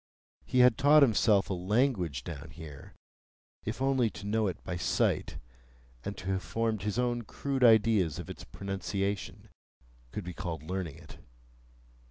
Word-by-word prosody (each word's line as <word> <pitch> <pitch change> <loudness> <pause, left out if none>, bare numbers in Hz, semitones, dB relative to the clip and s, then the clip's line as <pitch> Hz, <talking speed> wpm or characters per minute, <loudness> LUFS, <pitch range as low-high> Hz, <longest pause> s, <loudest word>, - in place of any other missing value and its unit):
He 125 - +3
had 125 +1 +5
taught 145 +1 +7
himself 105 -4 +4
a - - +1
language 90 - 0
down 80 -1 -7
here,—if 80 - -11
only 130 -4 +2
to 90 +1 -10
know 110 +1 +1
it 90 - -5
by 90 - -4
sight, 85 - 0 0.7
and 100 - -5
to 95 0 -4
have 95 -1 0
formed 115 -1 -1
his 105 +2 -2
own 120 -1 +1
crude 135 +4 -3
ideas 110 -8 +5
of - - -6
its - - -8
pronunciation, 100 +5 -4 0.6
could 105 - -5
be 90 0 -6
called 80 -4 -5
learning 90 -3 -4
it. - - -14
100 Hz, 150 wpm, -30 LUFS, 90-115 Hz, 0.7 s, taught